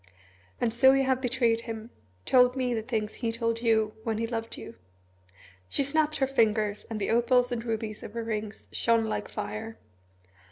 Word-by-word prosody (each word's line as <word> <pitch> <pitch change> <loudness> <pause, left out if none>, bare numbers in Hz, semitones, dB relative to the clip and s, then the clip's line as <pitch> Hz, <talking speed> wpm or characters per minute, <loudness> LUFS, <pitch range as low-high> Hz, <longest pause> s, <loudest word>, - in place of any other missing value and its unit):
"And 230 - +1
so 265 +3 +6
you 270 0 +3
have 260 -1 +1
betrayed 240 -3 +1
him 225 0 -7 0.3
told 250 0 +5
me 255 -2 0
the 225 - -1
things 220 -2 -2
he 230 -2 -2
told 230 0 -1
you 220 -2 +2
when 225 -2 -1
he 230 - -1
loved 225 -1 -4
you?" - - -9 1.0
She - - +1
snapped 305 +2 +1
her 270 - +2
fingers, 215 -5 +1
and 220 -2 -3
the 200 - -1
opals 245 +2 +3
and 235 -2 -2
rubies 220 -2 -3
of - - -9
her 230 0 -3
rings 215 -1 -4
shone 230 -1 +2
like 220 - -3
fire. 225 +1 -5
230 Hz, 185 wpm, -28 LUFS, 220-250 Hz, 1.0 s, so